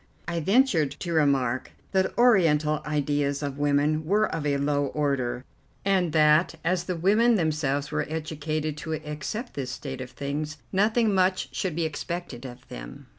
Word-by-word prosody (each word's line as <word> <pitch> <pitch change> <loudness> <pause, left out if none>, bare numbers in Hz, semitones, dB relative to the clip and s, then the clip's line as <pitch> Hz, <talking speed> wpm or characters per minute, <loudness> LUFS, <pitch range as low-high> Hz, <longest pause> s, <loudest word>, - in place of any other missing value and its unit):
I 170 -1 -1
ventured 190 - +3
to 170 -2 -2
remark 135 -5 +1 0.2
that 190 -1 +1
Oriental 160 -11 +4
ideas 145 -1 0
of 140 0 -4
women 145 +2 +2
were 205 +7 +2
of 155 -2 -2
a 140 -1 +2
low 145 0 +1
order, 135 -4 -1 0.4
and 190 -4 +2
that, 155 +2 +4
as 175 +1 0
the 180 - -2
women 215 +8 +4
themselves 150 -5 0
were - - -1
educated 155 -1 -3
to 160 +1 -4
accept 155 - -5
this 135 -3 -4
state 130 +1 -6
of 130 - -6
things, 145 +4 -4
nothing 215 +2 +2
much 185 0 +2
should 180 -5 -2
be 170 -1 0
expected 160 -4 -5
of 125 +1 -12
them. - - -10
155 Hz, 160 wpm, -26 LUFS, 145-175 Hz, 0.4 s, Oriental